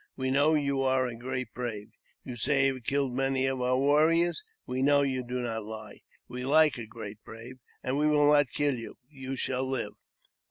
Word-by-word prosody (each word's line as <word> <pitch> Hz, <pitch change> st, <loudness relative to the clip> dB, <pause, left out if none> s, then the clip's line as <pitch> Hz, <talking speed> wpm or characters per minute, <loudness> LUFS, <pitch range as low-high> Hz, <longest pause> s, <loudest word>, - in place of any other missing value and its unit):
We 130 Hz, -1 st, -2 dB
know 145 Hz, +4 st, +4 dB
you 140 Hz, -2 st, 0 dB
are 130 Hz, -1 st, +2 dB
a 125 Hz, -, -4 dB
great 130 Hz, 0 st, -5 dB
brave. 115 Hz, -4 st, -5 dB, 0.3 s
You 125 Hz, -, -7 dB
say 135 Hz, +4 st, +2 dB
you 135 Hz, -, +2 dB
have 130 Hz, -2 st, -10 dB
killed 140 Hz, -2 st, 0 dB
many 135 Hz, 0 st, +1 dB
of 135 Hz, -1 st, -1 dB
our 125 Hz, +1 st, +2 dB
warriors; 160 Hz, -, +3 dB, 0.2 s
we 130 Hz, +1 st, -3 dB
know 145 Hz, +1 st, +4 dB
you 130 Hz, -2 st, -1 dB
do 125 Hz, +1 st, -3 dB
not 115 Hz, -2 st, -3 dB
lie. 110 Hz, +1 st, -9 dB, 0.3 s
We 125 Hz, 0 st, -6 dB
like 150 Hz, 0 st, +4 dB
a 115 Hz, -, -7 dB
great 110 Hz, -2 st, -9 dB
brave, 120 Hz, +3 st, -11 dB, 0.2 s
and 130 Hz, +3 st, -1 dB
we 150 Hz, -, +3 dB
will 150 Hz, -1 st, +4 dB
not 145 Hz, -3 st, +4 dB
kill 145 Hz, -3 st, 0 dB
you; 115 Hz, -, -9 dB
you 135 Hz, -2 st, -6 dB
shall 130 Hz, 0 st, -1 dB
live." 130 Hz, -2 st, -3 dB
130 Hz, 205 wpm, -29 LUFS, 125-140 Hz, 0.3 s, know